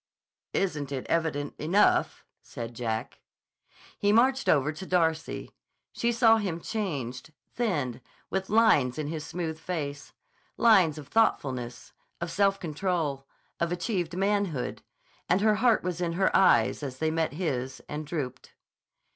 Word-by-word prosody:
"Isn't 150 Hz, -8 st, -1 dB
it 135 Hz, -2 st, -4 dB
evident 155 Hz, -4 st, 0 dB
enough?" 180 Hz, +7 st, +2 dB, 0.2 s
said 115 Hz, 0 st, -7 dB
Jack. 110 Hz, -2 st, -4 dB, 0.8 s
He 205 Hz, -, +3 dB
marched 260 Hz, +4 st, +3 dB
over 145 Hz, 0 st, +3 dB
to 160 Hz, +5 st, -8 dB
Darcy. 160 Hz, -3 st, 0 dB, 0.4 s
She 235 Hz, -, 0 dB
saw 230 Hz, -1 st, +5 dB
him 190 Hz, -6 st, -2 dB
changed, 150 Hz, -, -4 dB, 0.2 s
thinned, 150 Hz, -, -1 dB, 0.3 s
with 190 Hz, 0 st, -2 dB
lines 200 Hz, -, +4 dB
in 150 Hz, -1 st, -3 dB
his 155 Hz, -1 st, -4 dB
smooth 160 Hz, -1 st, -4 dB
face; 145 Hz, -5 st, -5 dB, 0.5 s
lines 185 Hz, -10 st, +5 dB
of 145 Hz, -3 st, -9 dB
thoughtfulness, 130 Hz, -, 0 dB, 0.3 s
of 170 Hz, 0 st, -4 dB
self 195 Hz, 0 st, +2 dB
control, 155 Hz, -4 st, -2 dB, 0.3 s
of 170 Hz, 0 st, 0 dB
achieved 175 Hz, -2 st, -2 dB
manhood, 195 Hz, -8 st, -1 dB, 0.5 s
and 180 Hz, +3 st, +3 dB
her 215 Hz, 0 st, +3 dB
heart 235 Hz, +1 st, +3 dB
was 180 Hz, -1 st, -3 dB
in 170 Hz, -1 st, 0 dB
her 190 Hz, +2 st, +1 dB
eyes 190 Hz, -, +4 dB
as 135 Hz, -3 st, -5 dB
they 160 Hz, +3 st, 0 dB
met 160 Hz, -2 st, 0 dB
his 135 Hz, -6 st, -3 dB
and 150 Hz, 0 st, -5 dB
drooped. 135 Hz, -5 st, -5 dB
165 Hz, 140 wpm, -28 LUFS, 145-195 Hz, 0.8 s, saw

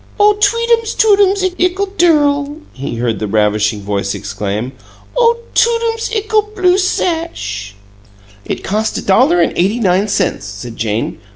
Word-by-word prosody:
"Oh, 415 Hz, 0 st, +6 dB
tweetums 465 Hz, +1 st, +2 dB
tootums 400 Hz, -2 st, +3 dB, 0.2 s
ickle 365 Hz, +3 st, +1 dB
dirl!" 290 Hz, -4 st, +2 dB, 0.2 s
he 135 Hz, -2 st, -5 dB
heard 115 Hz, -3 st, -2 dB
the 105 Hz, -, -3 dB
ravishing 105 Hz, 0 st, +1 dB
voice 100 Hz, -1 st, -2 dB
exclaim. 100 Hz, +4 st, -4 dB, 0.4 s
"Oh, 470 Hz, -1 st, +3 dB, 0.2 s
tootums 460 Hz, -1 st, +1 dB
ickle 425 Hz, -1 st, 0 dB
blue 370 Hz, -1 st, +3 dB
sash!" 325 Hz, -, -2 dB, 0.7 s
"It -, -, -5 dB
cost 215 Hz, +2 st, -1 dB
a -, -, -4 dB
dollar 260 Hz, -, +3 dB
and -, -, +1 dB
eighty 195 Hz, +7 st, +1 dB
nine 195 Hz, -1 st, +2 dB
cents," 195 Hz, -, -1 dB
said 105 Hz, +4 st, -8 dB
Jane. 110 Hz, 0 st, -2 dB
280 Hz, 135 wpm, -15 LUFS, -, 0.7 s, Oh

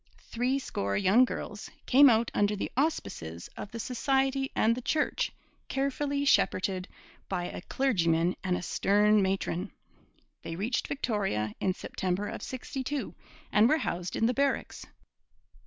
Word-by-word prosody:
Threescore 245 Hz, -, -2 dB
young 205 Hz, +6 st, +5 dB
girls 210 Hz, -3 st, -6 dB, 0.2 s
came 275 Hz, +2 st, +7 dB
out 230 Hz, 0 st, +2 dB
under 205 Hz, 0 st, +2 dB
the 200 Hz, -, -4 dB
auspices 85 Hz, -, -2 dB
of 210 Hz, -, -7 dB
the 230 Hz, -, -7 dB
society 270 Hz, +3 st, 0 dB
and 225 Hz, -, +3 dB
the 250 Hz, -, -4 dB
Church, 300 Hz, +5 st, 0 dB, 0.4 s
carefully 280 Hz, +1 st, -1 dB
shepherded 185 Hz, -7 st, +2 dB, 0.4 s
by 180 Hz, -2 st, -1 dB
a -, -, -6 dB
clergyman 175 Hz, -8 st, +1 dB
and 180 Hz, -2 st, +1 dB
a -, -, -6 dB
stern 210 Hz, +4 st, +3 dB
matron. 190 Hz, 0 st, -1 dB, 0.7 s
They 165 Hz, -, -6 dB
reached 225 Hz, +8 st, -1 dB
Victoria 200 Hz, -, -1 dB
in 185 Hz, -1 st, 0 dB
September 190 Hz, +2 st, -2 dB
of -, -, -6 dB
'62 265 Hz, +2 st, -4 dB, 0.4 s
and 215 Hz, +3 st, +5 dB
were 310 Hz, -, +4 dB
housed 180 Hz, -, -3 dB
in 225 Hz, -, +1 dB
the 245 Hz, -, +2 dB
barracks. 280 Hz, +1 st, -1 dB
215 Hz, 140 wpm, -29 LUFS, 185-265 Hz, 0.7 s, came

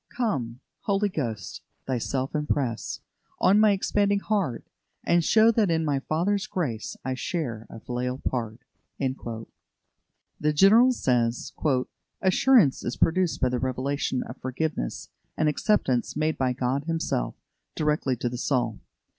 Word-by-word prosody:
"Come, 135 Hz, -, -2 dB, 0.2 s
Holy 200 Hz, 0 st, +1 dB
Ghost, 115 Hz, -, -4 dB, 0.2 s
Thyself 130 Hz, +1 st, -2 dB
impress 145 Hz, -6 st, -2 dB, 0.4 s
On 200 Hz, +3 st, +4 dB
my 215 Hz, 0 st, +6 dB
expanding 200 Hz, 0 st, +2 dB
heart: 200 Hz, -, -1 dB, 0.4 s
And 170 Hz, -1 st, +3 dB
show 220 Hz, +6 st, +5 dB
that 220 Hz, -4 st, +2 dB
in 160 Hz, -1 st, +1 dB
the 140 Hz, -2 st, 0 dB
Father's 195 Hz, +6 st, +1 dB
grace 125 Hz, -, -3 dB
I 130 Hz, -, -1 dB
share 125 Hz, -4 st, -3 dB
a -, -, -9 dB
filial 125 Hz, +2 st, -3 dB
part." 120 Hz, -4 st, -3 dB, 0.4 s
The 120 Hz, -, -6 dB
General 220 Hz, +10 st, +7 dB
says: 120 Hz, -, 0 dB, 0.7 s
"Assurance 190 Hz, -, +4 dB
is 120 Hz, -, -3 dB
produced 180 Hz, +1 st, +1 dB
by 130 Hz, -, +3 dB
the 125 Hz, 0 st, -1 dB
revelation 130 Hz, +1 st, -1 dB
of 125 Hz, -, -9 dB
forgiveness 130 Hz, -, -3 dB, 0.3 s
and 155 Hz, -, +2 dB
acceptance 150 Hz, -, +1 dB
made 155 Hz, +1 st, 0 dB
by 130 Hz, -1 st, 0 dB
God 130 Hz, +3 st, -1 dB
Himself 160 Hz, -, -1 dB, 0.4 s
directly 150 Hz, -4 st, +1 dB
to 120 Hz, -, -3 dB
the 120 Hz, 0 st, -4 dB
soul. 120 Hz, -6 st, 0 dB
140 Hz, 130 wpm, -26 LUFS, 125-185 Hz, 0.7 s, General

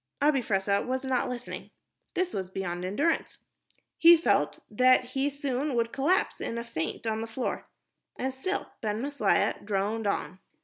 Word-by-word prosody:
Abi 290 Hz, -1 st, +4 dB
Fressah 200 Hz, -2 st, +1 dB
was 260 Hz, +1 st, -2 dB
not 260 Hz, -2 st, +1 dB
listening. 245 Hz, -1 st, -6 dB, 0.5 s
This 365 Hz, -1 st, 0 dB
was 190 Hz, -2 st, -3 dB
beyond 180 Hz, -2 st, -4 dB
endurance. 280 Hz, -, 0 dB, 0.6 s
He 335 Hz, +1 st, +9 dB
felt 325 Hz, -, +2 dB
that 255 Hz, +3 st, +4 dB
soon 275 Hz, +1 st, -1 dB
he 265 Hz, -, -2 dB
would 230 Hz, -1 st, 0 dB
collapse 315 Hz, +8 st, +1 dB
in 230 Hz, -, -3 dB
a 235 Hz, -, -3 dB
faint 195 Hz, -3 st, -4 dB
on 220 Hz, 0 st, -1 dB
the 225 Hz, -, -4 dB
floor. 235 Hz, +3 st, -4 dB, 0.5 s
And 260 Hz, +1 st, -2 dB
still 370 Hz, +10 st, -3 dB
Ben 215 Hz, -1 st, -1 dB
Maslia 285 Hz, +3 st, +1 dB
droned 205 Hz, +2 st, -1 dB
on. 190 Hz, -1 st, -2 dB
245 Hz, 160 wpm, -28 LUFS, 210-275 Hz, 0.6 s, He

